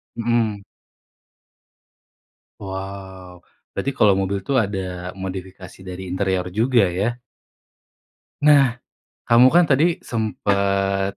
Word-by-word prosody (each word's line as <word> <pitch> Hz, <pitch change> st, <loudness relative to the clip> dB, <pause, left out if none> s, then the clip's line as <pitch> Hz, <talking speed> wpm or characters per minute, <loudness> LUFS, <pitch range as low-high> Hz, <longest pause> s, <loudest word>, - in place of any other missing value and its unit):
Mhm. 115 Hz, -3 st, 0 dB, 2.0 s
Wow. 95 Hz, -2 st, -8 dB, 0.3 s
Berarti 140 Hz, -, -2 dB
kalau 105 Hz, -2 st, +4 dB
mobil 95 Hz, 0 st, -2 dB
itu -, -, -5 dB
ada, 100 Hz, -3 st, -1 dB, 0.4 s
modifikasi 95 Hz, -1 st, -8 dB
dari 90 Hz, +1 st, -7 dB
interior 95 Hz, -1 st, -1 dB
juga 120 Hz, -1 st, +4 dB
ya? 105 Hz, +7 st, -2 dB, 1.2 s
Nah, 140 Hz, -5 st, +4 dB, 0.5 s
kamu 120 Hz, +2 st, +6 dB
kan 175 Hz, +6 st, +5 dB
tadi 160 Hz, +4 st, +2 dB
sempat, 100 Hz, -3 st, -1 dB
100 Hz, 90 wpm, -21 LUFS, 95-120 Hz, 2.0 s, kamu